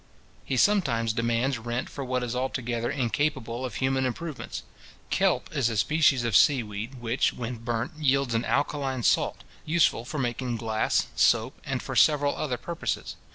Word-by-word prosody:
He 130 - -2
sometimes 120 - +2
demands 115 +3 0
rent 120 +2 -3
for 140 - -6
what 125 -1 -1
is 120 0 -3
altogether 120 -2 -2
incapable 125 -2 -1
of 125 -5 -4
human 130 0 +1
improvements. 145 +4 -4 0.5
Kelp - - +1
is 115 - +2
a 115 - -3
species 140 +3 +3
of 115 -3 0
sea 135 0 +5
weed, 105 +5 -6
which, 120 +1 0
when 120 0 -5
burnt, 115 +4 -2
yields 135 -4 +2
an 115 +1 +1
alkaline 135 -3 -1
salt, - - +2 0.2
useful 155 -7 +2
for 140 +5 -6
making 120 -2 -2
glass, 110 -1 0
soap, - - +2
and - - -3
for - - -5
several 145 -2 +4
other 130 -5 -2
purposes. 165 +7 -4
125 Hz, 160 wpm, -27 LUFS, 115-140 Hz, 0.5 s, sea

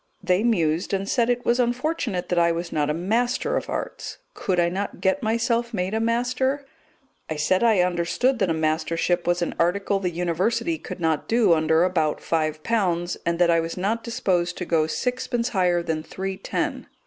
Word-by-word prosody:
They 185 +2 +2
mused 175 -5 +1
and 195 0 -3
said 235 +2 +1
it 245 0 0
was 240 +1 +2
unfortunate 245 - -1
that 175 - +2
I 170 0 +4
was 170 +1 -4
not 150 -1 0
a - - +1 0.2
Master 240 +2 +1
of - - -2
Arts. - - -5 0.2
Could 185 -2 -1
I 170 - +4
not 195 +3 -4
get 190 +9 +1
myself 230 +1 0
made 185 +1 -2
a 220 - +1
Master? 250 +4 0 0.6
I 155 - -2
said 185 +7 +1
I 220 -5 +4
understood 180 +9 +1
that 195 -4 +1
a - - +2
Mastership 165 +2 0
was 175 0 +2
an - - -2
article 195 +3 +1
the 185 -2 -1
University 180 - -1
could - - -8
not 160 -3 0
do 225 -6 +4
under 160 +1 +3
about 160 -5 +1
five 155 -2 -1
pounds, 180 -6 0
and 170 0 +1
that 175 -1 +4
I 165 - +4
was 165 +2 -4
not 215 +5 -1
disposed 185 -7 -1
to 180 - -4
go 160 -2 +2
sixpence 250 +3 -1
higher 180 -4 +1
than 160 -2 -2
three 190 +4 -5
ten. - - -3
185 Hz, 195 wpm, -24 LUFS, 170-230 Hz, 0.6 s, I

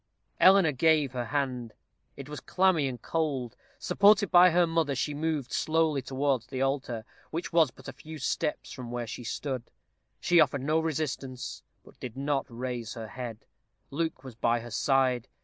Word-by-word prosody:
Eleanor 190 -4 +6
gave 150 0 +3
her 125 -2 -3
hand. 125 -3 -2 0.4
It 140 -1 -8
was 150 -2 -6
clammy 180 -2 +2
and 125 -2 -5
cold. 140 -5 -2 0.2
Supported 205 -1 +4
by 180 +1 +8
her 175 +1 +4
mother, 165 -4 0
she 145 +3 -1
moved 150 -3 -2
slowly 160 -3 +1
towards 130 -2 -1
the 130 0 -5
altar, 135 -4 -1 0.2
which 165 +2 -4
was 165 -2 +5
but - - -15
a - - -6
few 160 0 -10
steps 150 +2 -2
from 125 -3 -7
where 120 0 -3
they 115 +2 -7
stood. 125 +1 -4 0.5
She 175 -1 +4
offered 140 -3 +3
no 155 +3 +2
resistance, 145 -5 -3 0.2
but - - -19
did 125 -1 -7
not 140 0 -1
raise 120 -1 -5
her 110 -2 -7
head. 120 -3 -7 0.5
Luke 160 -2 -2
was 130 -2 -9
by 120 +1 +1
her 120 0 -9
side. 130 0 +1
135 Hz, 170 wpm, -29 LUFS, 125-160 Hz, 0.5 s, by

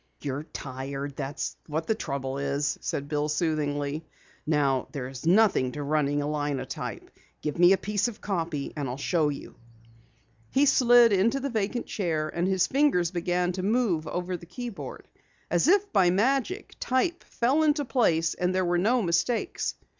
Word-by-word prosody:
"You're 140 0 -2
tired, 135 0 -6
that's 140 +1 -4
what's 160 +1 -2
the 220 - +2
trouble," 140 -8 -4 0.2
said 145 -1 -2
Bill 150 0 -1
soothingly. 150 -1 -1 0.4
"Now 140 -4 +1
there's 135 0 -5
nothing 185 - +4
to 145 - -4
running 145 0 +1
a - - -2
linotype. 145 -3 -4 0.3
Give 150 +2 -3
me 175 +1 +7
a 195 - +5
piece 210 +3 0
of 230 -3 -7
copy 165 -7 -3
and 145 -3 -3
I'll 125 - -4
show 155 +1 +1
you." 145 - -7 1.0
He 275 +2 +3
slid 245 -4 +6
into 225 +8 +2
the 275 0 -3
vacant 220 +2 -1
chair 160 -6 -1
and 170 +3 -1
his 190 -2 +2
fingers 265 - +2
began 175 0 0
to 185 +1 -4
move 195 -6 +1
over 180 +2 -3
the 170 -1 -10
keyboard. 185 - -7 0.4
As 175 - +3
if 405 +3 +3
by 190 -4 +5
magic, 270 - 0
type 335 +7 0
fell 260 +6 +1
into 295 -1 +2
place, 170 -10 +2
and 180 +1 -1
there 185 -1 +2
were 175 0 +1
no 230 +5 +2
mistakes. 215 - 0
175 Hz, 160 wpm, -27 LUFS, 145-225 Hz, 1.0 s, me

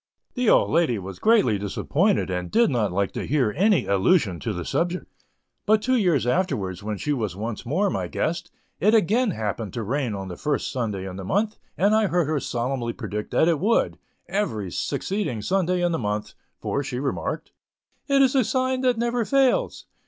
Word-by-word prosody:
The 250 -3 +1
old - - +4
lady 160 -8 +2
was 95 -1 -7
greatly 205 - +3
disappointed, 145 - 0
and 90 -1 -3
did 235 -7 +3
not 110 -6 0
like 100 +1 0
to - - -5
hear 130 -7 +1
any 190 - +3
allusion 100 - +2
to 115 - -3
the 90 -4 -4
subject; 175 +1 -1 0.6
but 215 +1 +5
two 255 +4 +1
years 175 - +2
afterwards, 115 - -1
when 105 0 -4
she 150 +8 -1
was 110 -9 -2
once 110 +3 -5
more 185 +10 +1
my - - -2
guest, 170 +2 -2 0.3
it 210 +4 +4
again 220 +4 +3
happened 110 - -3
to 115 - -3
rain 125 0 -1
on 95 -1 -5
the 90 - -7
first 150 -2 -1
Sunday 105 -7 -3
in 95 0 -7
the 95 - -6
month, 210 - 0 0.2
and 200 +3 +3
I 220 -1 +3
heard 175 -2 +1
her 150 0 0
solemnly 120 -1 -2
predict 105 0 -5
that 160 - +3
it 165 -4 +2
would, 220 +6 +1 0.3
every 110 - -2
succeeding 140 - -2
Sunday 180 - +1
in 175 - +2
the 165 - -1
month, 105 -2 -3 0.3
for, 140 - -1
she 125 -3 -4
remarked, 135 0 -3 0.6
"it 275 -1 +4
is 260 - +3
a 265 -2 +4
sign 255 +2 0
that 250 -2 +2
never 235 +1 0
fails." 270 +2 +1
145 Hz, 195 wpm, -24 LUFS, -, 0.6 s, but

